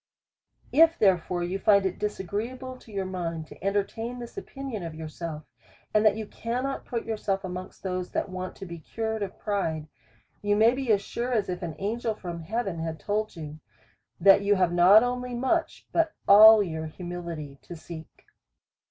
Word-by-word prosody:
If 330 Hz, +2 st, +6 dB
therefore 180 Hz, -3 st, +2 dB
you 180 Hz, +3 st, -2 dB
find 200 Hz, -1 st, +4 dB
it 190 Hz, -, -2 dB
disagreeable 215 Hz, +6 st, -4 dB
to 235 Hz, -, -16 dB
your 195 Hz, -2 st, -2 dB
mind 170 Hz, -4 st, -4 dB
to -, -, -14 dB
entertain 205 Hz, +5 st, -1 dB
this 240 Hz, -1 st, -8 dB
opinion 270 Hz, -, -6 dB
of 165 Hz, -2 st, -6 dB
yourself, 160 Hz, 0 st, -6 dB, 0.5 s
and 215 Hz, -, +4 dB
that 215 Hz, -1 st, +4 dB
you 220 Hz, -, -4 dB
cannot 250 Hz, +6 st, -3 dB
put 235 Hz, -2 st, -3 dB
yourself 205 Hz, -3 st, -2 dB
amongst 185 Hz, 0 st, -7 dB
those 185 Hz, -1 st, -3 dB
that -, -, -2 dB
want 185 Hz, -1 st, -6 dB
to 195 Hz, -, -8 dB
be 170 Hz, -2 st, -8 dB
cured 220 Hz, +6 st, -3 dB
of 195 Hz, -1 st, -4 dB
pride, 165 Hz, -7 st, -2 dB, 0.5 s
you 205 Hz, 0 st, +2 dB
may 220 Hz, +3 st, +5 dB
be 260 Hz, -3 st, -1 dB
as 200 Hz, -1 st, +3 dB
sure 240 Hz, +4 st, -3 dB
as 215 Hz, -5 st, +1 dB
if 180 Hz, -1 st, -3 dB
an 165 Hz, -3 st, -4 dB
angel 225 Hz, +2 st, -2 dB
from 175 Hz, -4 st, -6 dB
heaven 195 Hz, -1 st, -3 dB
had 160 Hz, -1 st, -4 dB
told 210 Hz, +6 st, -2 dB
you, 155 Hz, -2 st, -8 dB, 0.6 s
that 195 Hz, 0 st, +7 dB
you 205 Hz, 0 st, +3 dB
have 180 Hz, -2 st, +2 dB
not 185 Hz, +6 st, +7 dB
only 250 Hz, 0 st, -2 dB
much, 265 Hz, +7 st, -1 dB
but 330 Hz, -1 st, +1 dB
all 215 Hz, +1 st, +9 dB
your 160 Hz, -3 st, -4 dB
humility 170 Hz, -4 st, -7 dB
to 175 Hz, -, -9 dB
seek. 160 Hz, -1 st, -11 dB
200 Hz, 180 wpm, -27 LUFS, 175-225 Hz, 0.6 s, all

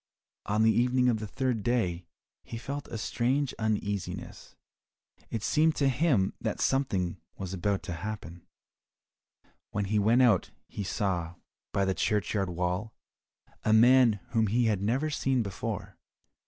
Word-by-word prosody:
On 105 Hz, +2 st, +2 dB
the 110 Hz, -, +5 dB
evening 125 Hz, +2 st, +3 dB
of 110 Hz, -3 st, +1 dB
the 110 Hz, -, -5 dB
third 125 Hz, 0 st, -1 dB
day 95 Hz, -7 st, 0 dB, 0.4 s
he 115 Hz, -, -7 dB
felt 140 Hz, +4 st, -5 dB
a 115 Hz, -, -5 dB
strange 125 Hz, +5 st, 0 dB
uneasiness, 105 Hz, -3 st, -3 dB, 0.7 s
it 110 Hz, -3 st, -4 dB
seemed 155 Hz, +1 st, +3 dB
to 140 Hz, -2 st, +2 dB
him 130 Hz, -, +2 dB
that -, -, -2 dB
something 95 Hz, -, 0 dB, 0.2 s
was 95 Hz, -1 st, -5 dB
about 95 Hz, +1 st, -1 dB
to 90 Hz, -, -5 dB
happen. 90 Hz, -2 st, -6 dB, 1.3 s
When 100 Hz, -1 st, -2 dB
he 105 Hz, +2 st, +1 dB
went 115 Hz, +5 st, +4 dB
out 120 Hz, -3 st, +3 dB, 0.2 s
he 100 Hz, -, -5 dB
saw, 90 Hz, -4 st, -2 dB, 0.4 s
by 100 Hz, -, +1 dB
the 95 Hz, -, +1 dB
churchyard 100 Hz, -1 st, 0 dB
wall, 90 Hz, +5 st, -2 dB, 0.7 s
a 110 Hz, -, +3 dB
man 120 Hz, +1 st, +6 dB, 0.2 s
whom 110 Hz, -2 st, +2 dB
he 120 Hz, +4 st, +2 dB
had 105 Hz, -4 st, +1 dB
never 130 Hz, +9 st, 0 dB
seen 135 Hz, -4 st, +1 dB
before. 100 Hz, -2 st, -5 dB
110 Hz, 145 wpm, -29 LUFS, 95-125 Hz, 1.3 s, man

